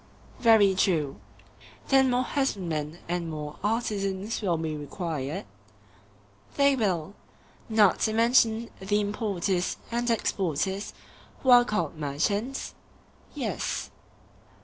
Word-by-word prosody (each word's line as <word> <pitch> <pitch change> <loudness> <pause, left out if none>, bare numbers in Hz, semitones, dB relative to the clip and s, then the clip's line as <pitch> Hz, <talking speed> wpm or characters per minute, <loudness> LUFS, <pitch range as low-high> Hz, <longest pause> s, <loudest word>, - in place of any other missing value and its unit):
Very 220 -4 +6
true. 165 -7 +1 0.7
Then 270 -1 +5
more 250 0 +2
husbandmen 175 - -2
and 175 -1 -2
more 150 -1 -6
artisans 205 -2 -1
will 180 -5 +1
be 160 -1 -3
required? 155 +2 -4 1.1
They 280 -1 +4
will. 195 -6 -1 0.6
Not 215 -4 +4
to 220 - +1
mention 230 0 +3
the 205 +2 0
importers 200 -3 -1
and 240 +1 0
exporters, 195 -2 -1 0.5
who 260 - +4
are 245 0 +8
called 170 -8 -2
merchants? 200 - -2 0.6
Yes. - - -3
200 Hz, 100 wpm, -27 LUFS, 165-230 Hz, 1.1 s, are